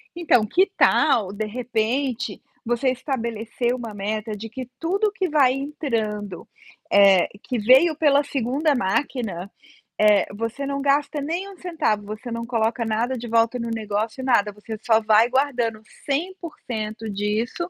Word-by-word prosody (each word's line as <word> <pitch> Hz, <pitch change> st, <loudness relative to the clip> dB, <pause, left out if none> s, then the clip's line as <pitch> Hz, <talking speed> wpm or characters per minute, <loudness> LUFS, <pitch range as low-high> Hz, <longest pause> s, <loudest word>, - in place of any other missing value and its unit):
Então, 320 Hz, -10 st, +3 dB
que 370 Hz, -, +2 dB
tal, 230 Hz, -11 st, +3 dB
de 210 Hz, +2 st, -3 dB
repente, 240 Hz, +3 st, -2 dB, 0.2 s
você 240 Hz, +3 st, +1 dB
estabelecer 240 Hz, -2 st, -2 dB
uma 235 Hz, -4 st, -6 dB
meta 215 Hz, +2 st, -3 dB
de 220 Hz, +2 st, -8 dB
que 255 Hz, +1 st, -7 dB
tudo 395 Hz, +6 st, 0 dB
que 380 Hz, -2 st, -2 dB
vai 280 Hz, -4 st, +4 dB
entrando, 225 Hz, -, -3 dB, 0.4 s
eh, 195 Hz, -3 st, +6 dB, 0.2 s
que 250 Hz, -, -3 dB
veio 260 Hz, +9 st, +5 dB
pela 290 Hz, -2 st, +3 dB
2ª 280 Hz, +3 st, 0 dB
máquina, 200 Hz, -4 st, -2 dB, 0.5 s
eh, 210 Hz, -1 st, +5 dB
você 230 Hz, +6 st, -4 dB
não 280 Hz, 0 st, -2 dB
gasta 285 Hz, +1 st, +1 dB
nem 340 Hz, +7 st, -3 dB
um 390 Hz, -, -13 dB
centavo, 320 Hz, -, -1 dB
você 215 Hz, +4 st, -7 dB
não 230 Hz, 0 st, -4 dB
coloca 230 Hz, 0 st, 0 dB
nada 230 Hz, +4 st, -1 dB
de 240 Hz, 0 st, -6 dB
volta 230 Hz, +1 st, +2 dB
no 235 Hz, 0 st, -3 dB
negócio, 220 Hz, +2 st, -3 dB
nada. 210 Hz, -5 st, +2 dB
Você 215 Hz, +2 st, -8 dB
só 225 Hz, -2 st, +4 dB
vai 220 Hz, +2 st, +4 dB
guardando 245 Hz, -5 st, 0 dB, 0.2 s
100% 275 Hz, -, -4 dB
disso 215 Hz, -, -2 dB
235 Hz, 145 wpm, -23 LUFS, 215-280 Hz, 0.5 s, eh